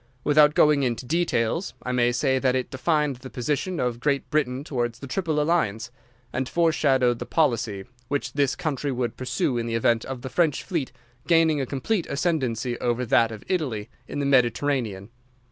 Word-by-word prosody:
Without 150 0 +5
going 150 -2 +5
into 125 -1 -1
details, 165 - 0
I 125 - -3
may 120 -1 +2
say 130 +2 +1
that 130 -1 +2
it 130 -1 -2
defined 150 0 0
the 130 +1 -10
position 150 +8 -2
of 120 -2 -1
Great 140 +1 0
Britain 140 -3 0
towards 120 -5 -2
the 135 - -9
Triple 160 +1 -1
Alliance, 120 -9 0 0.4
and 130 0 -2
fore 170 +1 +3
shadowed 130 -6 +2
the - - -4
policy 115 -10 0 0.2
which 145 +2 -2
this 140 -2 +1
country 150 -4 -2
would 125 -2 -2
pursue 130 0 -1
in 115 - -3
the 115 - -2
event 115 0 +2
of 130 -2 -6
the 130 - -4
French 160 -1 +1
fleet 165 -10 -3 0.4
gaining 165 -3 +4
a 130 - -3
complete 165 - -1
ascendancy 130 -7 -1
over 120 +1 0
that 115 0 +3
of 110 -2 -8
Italy 130 - -2 0.2
in - - -6
the 140 - -1
Mediterranean. 120 -5 +1
130 Hz, 180 wpm, -25 LUFS, 120-150 Hz, 0.4 s, Without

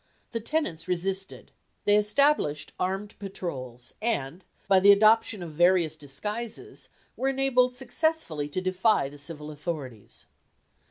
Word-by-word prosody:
The 230 - -2
tenants 225 - -2
resisted. 190 +2 -2 0.3
They 205 - +5
established 210 - +2
armed 195 +3 -2
patrols, 130 - -6
and, 185 - -1 0.2
by 195 -1 +6
the 200 +2 +8
adoption 215 -1 +4
of 165 - -7
various 175 0 +3
disguises, 210 - -6 0.3
were 265 - 0
enabled 260 -2 +2
successfully 250 - -1
to 185 +5 -2
defy 185 -3 +2
the 145 +1 -13
civil 150 0 -8
authorities. 145 - -7
190 Hz, 120 wpm, -27 LUFS, 150-225 Hz, 0.3 s, the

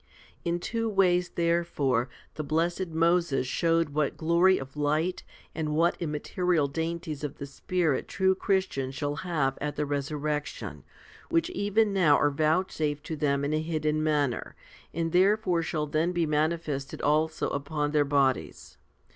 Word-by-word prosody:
11. 170 0 0
In - - -3
two 230 +5 -2
ways, 180 -3 +3
therefore, 170 -8 +1 0.2
the 155 - -4
blessed 170 +5 0
Moses 165 -4 +2
showed 165 +3 +1
what 145 0 -1
glory 170 +4 +4
of 135 +1 -8
light 155 +4 0 0.3
and 155 -2 -2
what 170 +2 +3
immaterial 165 0 0
dainties 160 0 -4
of 145 - -4
the 140 - -5
Spirit 155 +2 -1
true 190 -1 +2
Christians 185 -9 -1
shall 145 +1 -2
have 150 -7 -1
at 145 0 -2
the 150 - -1
resurrection, 145 +1 -3 0.5
which 335 +1 +1
even 205 - +1
now 160 -7 +5
are 145 - +2
vouchsafed 155 -1 0
to 160 - -4
them 140 -1 0
in 145 - -1
a 155 - +1
hidden 155 -1 -1
manner, 145 -5 0 0.4
and 165 0 -2
therefore 185 -1 +3
shall 155 -2 -2
then 155 +4 0
be 170 -2 +1
manifested 150 -2 -1
also 155 +2 +1
upon 145 +1 -2
their 150 -1 +3
bodies. 140 -2 0
155 Hz, 150 wpm, -28 LUFS, 145-175 Hz, 0.5 s, now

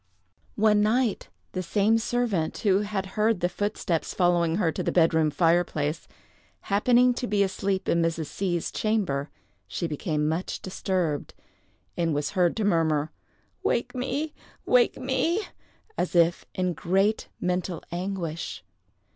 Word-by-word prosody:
One 210 0 +4
night, 225 +1 +1 0.2
the 185 - -3
same 205 +5 +2
servant 225 -8 -1
who 200 -3 +3
had 205 -2 -2
heard 215 -1 +2
the 175 - +2
footsteps 180 -3 -2
following 175 -2 +2
her 170 -5 +1
to - - -4
the - - -1
bed 165 -2 +4
room 160 -1 +3
fireplace, 165 -1 +1 0.5
happening 245 +5 +3
to 245 0 -3
be 205 -2 +2
asleep 195 0 -1
in 170 - +2
Mrs. 165 -1 0
C——'s 175 +1 -2
chamber, 185 -11 -1 0.4
she 175 - -3
became 150 -1 -1
much 160 +4 -2
disturbed, 180 -5 -2 0.6
and 165 -3 0
was 145 0 -1
heard 180 -1 +2
to 220 - 0
murmur, 160 -6 +1 0.5
"Wake 235 - 0
me! 270 +5 -2 0.3
wake 250 -1 +4
me!" 270 +9 0 0.6
as 180 - -1
if 170 0 +3
in 180 -1 0
great 195 +8 +1
mental 180 -1 -2
anguish. 175 -2 -4
185 Hz, 140 wpm, -26 LUFS, 165-215 Hz, 0.6 s, One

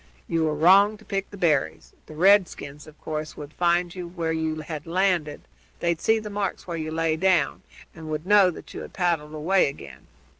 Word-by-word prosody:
"You 165 -1 0
were 155 -1 0
wrong 195 +7 +5
to 215 - -19
pick 195 -1 -3
the 200 - -11
berries. 160 -7 0
The 155 - -11
redskins, 170 -5 +2
of 155 - -16
course, 155 -1 -5
would 150 +1 -9
find 175 0 +1 0.2
where 165 -1 -1
you 160 -1 -2
had 155 0 -7
landed, 175 -4 0 0.4
they'd 170 -1 -1
see 220 - +3
the 215 -1 -6
marks 200 -2 -3
where 170 - -5
you 155 -1 -4
lay 160 0 0
down, 175 -5 +2 0.3
and 160 -2 -10
would 155 +1 -4
know 200 -1 +6
that 175 - -10
you - - -6
had - - -10
paddled 165 -4 -1
away 170 +3 +2
again. 70 - -12
165 Hz, 195 wpm, -25 LUFS, 155-190 Hz, 0.4 s, know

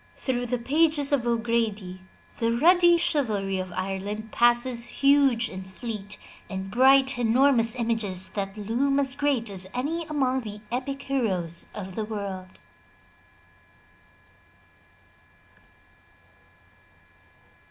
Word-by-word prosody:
Through 245 -2 -2
the 250 +1 -1
pages 290 +3 +1
of 255 -4 +1
O'Grady 225 -5 -1 0.4
the 230 0 +1
ruddy 345 +7 +5
chivalry 210 - 0
of 185 -1 -5
Ireland 195 +4 -4
passes 240 0 +3 0.2
huge 275 -4 +4
and 190 -1 -7
fleet 205 +1 -7 0.3
and 190 -1 -5
bright, 265 +2 +4
enormous 240 0 +3
images 225 -6 -1
that 195 0 -5
loom 250 +7 0
as 270 -1 +2
great 280 -5 0
as 185 -1 -5
any 320 +7 -2
among 265 -4 0
the 210 -2 -8
epic 275 +3 -3
heroes 185 -11 -2
of 190 -3 -7
the 220 - -3
world. 200 -3 -6
235 Hz, 105 wpm, -26 LUFS, 200-270 Hz, 0.4 s, ruddy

